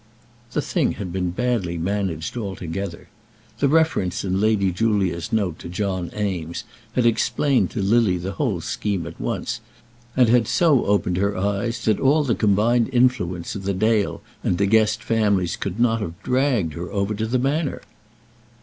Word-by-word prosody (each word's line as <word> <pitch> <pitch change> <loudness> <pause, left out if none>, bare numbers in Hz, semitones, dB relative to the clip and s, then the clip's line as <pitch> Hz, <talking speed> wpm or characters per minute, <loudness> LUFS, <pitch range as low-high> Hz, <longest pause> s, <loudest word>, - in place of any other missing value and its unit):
The - - 0
thing - - 0
had 90 -4 -6
been 90 -1 -1
badly 95 -4 -1
managed 90 -2 -2
altogether. 95 -4 -5 0.5
The 140 - +3
reference 150 - +2
in 95 +1 0
Lady 105 -3 +2
Julia's 95 -4 0
note 100 -7 0
to - - -8
John 95 -1 -2
Eames 90 -5 -3 0.3
had 125 -1 +1
explained 120 +4 +2
to 105 - -3
Lily 105 -2 +3
the 90 +2 -4
whole 100 - -1
scheme 100 +1 -2
at - - -9
once, 120 -1 -3 0.6
and 125 -2 +6
had 115 -1 +4
so 155 -7 +3
opened 90 -3 +1
her 100 +1 0
eyes 100 +5 -1
that 110 -2 +2
all 145 +3 +3
the 125 -5 +1
combined 110 +4 +2
influence 120 -9 +1
of 100 -2 -6
the 100 0 -1
Dale 110 +1 +1 0.2
and 90 - +1
De 100 - +2
Guest 110 +1 +3
families 100 -6 +1
could 100 +2 -4
not 115 -2 +2
have 85 -3 -5
dragged 125 - +1
her 85 +3 -6
over 100 +1 -1
to 110 +2 -2
the 125 +3 +1
Manor. 140 +3 -1
105 Hz, 170 wpm, -22 LUFS, 90-120 Hz, 0.6 s, and